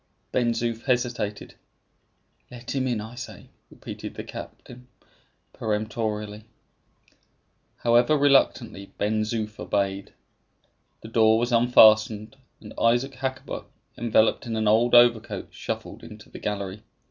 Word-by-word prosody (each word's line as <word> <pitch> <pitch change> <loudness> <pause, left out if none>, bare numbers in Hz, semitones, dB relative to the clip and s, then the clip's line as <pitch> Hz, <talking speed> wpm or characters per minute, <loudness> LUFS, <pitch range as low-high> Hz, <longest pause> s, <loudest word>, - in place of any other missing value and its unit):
Ben 120 -2 +1
Zoof 115 -1 -3
hesitated. 120 -5 -2 1.0
"Let 120 -1 -8
him 130 -1 -1
in, 120 -3 -1
I 110 +3 -8
say," 120 0 -10 0.2
repeated - - -9
the - - -6
captain, 125 0 -11 0.7
peremptorily. 105 -1 -3 1.3
However 120 +5 +3
reluctantly, 120 -8 +2
Ben 110 +1 0
Zoof 110 -1 -3
obeyed. 100 -1 -2 0.9
The - - -10
door 110 -1 +4
was 120 +2 -1
unfastened, 110 -2 +5 0.2
and 105 - -11
Isaac 120 +4 +2
Hakkabut, 130 0 -5 0.3
enveloped 115 0 +2
in 115 - -3
an 110 -1 0
old 115 +3 +4
overcoat, 120 -2 +3
shuffled - - -6
into - - -13
the - - -9
gallery. 100 -1 -4
115 Hz, 115 wpm, -25 LUFS, 105-120 Hz, 1.3 s, unfastened